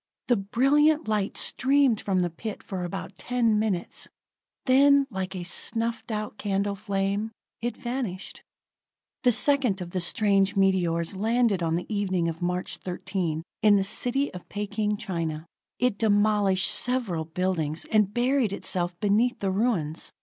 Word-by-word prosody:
The 245 - +5
brilliant 280 +9 +2
light 210 -2 -1
streamed 270 -4 +2
from 190 -2 0
the 175 - -2
pit 215 +5 -7
for 185 -2 -5
about 180 +2 -6
ten 235 -4 +1
minutes; 205 -5 -3 0.6
then 280 +2 +5
like 190 -1 -4
a 180 - -4
snuffed 230 +6 -2
out 215 -1 -4
candle 200 0 -1
flame, 200 +1 -2 0.3
it 240 +1 -3
vanished. 240 -7 -5 0.8
The 250 - +4
second 255 -5 +3
of 175 -1 -7
the 185 - -2
strange 195 +2 +2
meteors 185 -3 +1
landed 220 -1 +1
on 165 -1 0
the 175 - -3
evening 185 -4 0
of 165 0 -4
March 180 +1 -2
13th, 180 -3 -3 0.2
in 210 -1 +6
the 195 - +2
city 250 +7 0
of 180 - -10
Peking, 210 0 -2
China. 165 -5 -4 0.3
It 250 -4 0
demolished 205 -3 +3
several 235 -10 0
buildings, 165 -2 -2
and 210 -2 +3
buried 245 -1 +1
itself 175 -3 -2
beneath 220 +4 +2
the 195 -1 -1
ruins. 185 -7 -1
200 Hz, 145 wpm, -26 LUFS, 185-230 Hz, 0.8 s, in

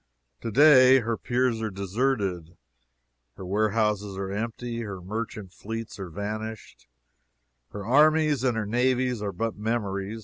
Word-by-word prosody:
To - - -3
day 130 0 +7
her 115 0 -1
piers 120 -1 0
are 110 - -2
deserted, 100 -4 -2 0.8
her 95 - -8
warehouses 105 0 0
are 95 0 -4
empty, 115 +3 -4
her 100 -4 -6
merchant 105 0 -6
fleets 115 +1 -7
are 95 -2 -6
vanished, 105 - -6 0.8
her 105 -1 -7
armies 150 +2 +4
and 125 -3 +1
her 110 - -1
navies 125 +1 +1
are 100 -1 -2
but 110 +4 -3
memories. 105 -1 -3
110 Hz, 135 wpm, -26 LUFS, 100-120 Hz, 0.8 s, day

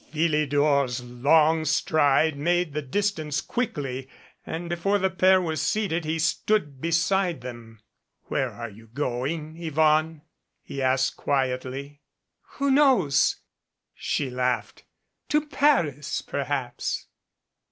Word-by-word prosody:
Philidor's 145 -4 +1
long 150 +6 +3
stride 155 0 +2
made 170 +2 0
the 150 - -2
dis 200 +9 0
tance 155 -4 -3
quickly, 135 - -3 0.4
and 170 +2 -4
before 175 +4 0
the 190 -1 0
pair 185 0 +4
were 165 -3 -2
seated, 170 +1 -1
he 160 +1 -1
stood 160 -3 0
beside 170 0 +1
them. 120 -3 -10 0.4
"Where - - -1
are 115 -2 -7
you 110 +3 -15
going, 145 +6 -3
Yvonne?" 155 0 +1 0.4
he 140 - -6
asked 130 0 +1
quietly. 135 +1 -2 0.5
"Who 280 0 0
knows?" 260 - +3 0.5
she 140 -4 -2
laughed. 125 0 -2 0.4
"To 300 0 +2
Paris, 265 - +1
perhaps." 135 -3 -3
150 Hz, 110 wpm, -25 LUFS, 135-170 Hz, 0.5 s, pair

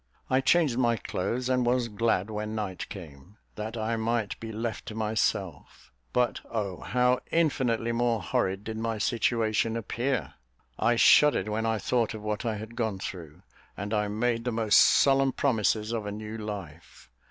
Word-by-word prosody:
I 130 +1 +4
changed 140 -4 +3
my 120 -2 +2
clothes, 120 +6 -3
and 130 -1 +2
was 120 0 +1
glad 110 -2 0
when 105 +1 -4
night 100 -4 -4
came, 85 +1 -11 0.2
that 110 +2 -5
I 115 +1 -1
might 115 -1 -1
be 115 0 -6
left 110 +1 -4
to 110 - -6
myself; 100 - -2 0.2
but 125 -1 +1
oh, 100 -5 -3
how 125 +1 +2
infinitely 125 -8 +1
more 115 -1 +1
horrid 95 +2 -1
did 110 +1 -5
my 115 0 -2
situation 115 +1 +1
appear! 120 +3 -2 0.5
I 120 - +3
shuddered 150 +2 +5
when 110 +1 -1
I 110 0 +1
thought 115 0 0
of 105 - -8
what 105 +2 -3
I 110 - 0
had 110 +2 -8
gone 110 -5 -1
through, 85 -5 -8 0.3
and 100 +2 -4
I 105 -1 +1
made 115 +3 0
the 125 - -1
most 110 -2 +4
solemn 135 -1 +5
promises 110 -4 +1
of 110 -3 -3
a - - -3
new 105 +1 -6
life. 100 - -8
110 Hz, 170 wpm, -28 LUFS, 105-120 Hz, 0.5 s, shuddered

